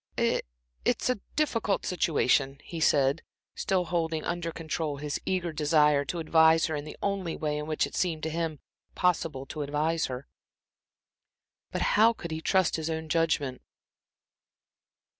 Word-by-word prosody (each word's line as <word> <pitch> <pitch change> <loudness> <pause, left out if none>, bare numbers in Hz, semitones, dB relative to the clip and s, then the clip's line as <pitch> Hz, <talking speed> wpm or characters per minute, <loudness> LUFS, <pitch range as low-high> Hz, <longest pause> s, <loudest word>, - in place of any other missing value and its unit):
"I - - +2 0.4
it's 255 - +1
a 250 - -2 0.2
difficult 230 -9 0
situation," 140 -5 +2
he 170 - -6
said, 140 -1 +3 0.3
still 185 -2 0
holding 165 -2 -1
under 170 -1 -2
control 155 -2 -3
his 145 0 -3
eager 180 -3 -1
desire 150 -1 +3
to 175 - -4
advise 160 0 +5
her 160 - -2
in 145 0 -4
the 155 - -9
only 195 -4 -1
way 150 -1 -2
in 150 - -5
which 155 -1 +1
it - - -9
seemed 165 -4 -1
to 160 - -1
him 160 -2 -3 0.3
possible 165 -7 0
to 150 +2 -6
advise 150 +3 0
her. 130 +1 -6 1.4
But - - -2
how 225 +2 +6
could 170 -7 -7
he 160 0 -3
trust 190 0 +2
his 160 0 -3
own 160 0 -3
judgment? 150 -6 +1
160 Hz, 155 wpm, -28 LUFS, 150-170 Hz, 1.4 s, how